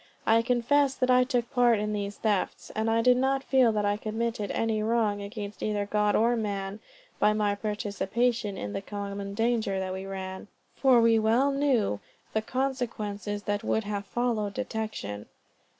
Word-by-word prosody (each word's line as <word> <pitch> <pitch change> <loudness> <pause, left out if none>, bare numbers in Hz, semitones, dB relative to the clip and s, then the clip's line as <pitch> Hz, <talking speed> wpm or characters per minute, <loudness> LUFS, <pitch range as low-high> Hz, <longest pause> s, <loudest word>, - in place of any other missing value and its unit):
I 225 +1 +5
confess 260 +3 +2
that 255 0 +1
I 250 0 +6
took 245 -2 -1
part 245 -3 +4
in 210 +1 -2
these 205 -1 -3
thefts, 210 -4 -1
and 220 +1 0
I 225 0 +2
do 250 +1 +6
not 265 +2 +1
feel 260 -4 +4
that 210 -1 0
I 205 0 +1
committed 220 -1 -2
any 220 -1 0
wrong, 215 -2 +1
against 205 0 -7
either 210 -1 -1
God 210 0 +1
or 235 +2 +3
man, 200 -2 -3 0.4
by 210 - +4
my 210 -1 +1
participation 210 +1 -1
in 100 - -5
the - - -3
common 200 0 -5
danger 225 -3 +1
that 185 -1 -3
we 190 +1 -5
ran, 190 0 -6 0.3
for 260 -3 +5
we 230 -1 +5
well 235 +6 +3
knew 265 - +1 0.3
the 220 - +1
consequences 215 -6 -3
that 205 0 -2
would 220 - 0
have 205 -1 -4
followed 225 -3 -1
detection. 220 - -4
215 Hz, 170 wpm, -28 LUFS, 205-240 Hz, 0.4 s, I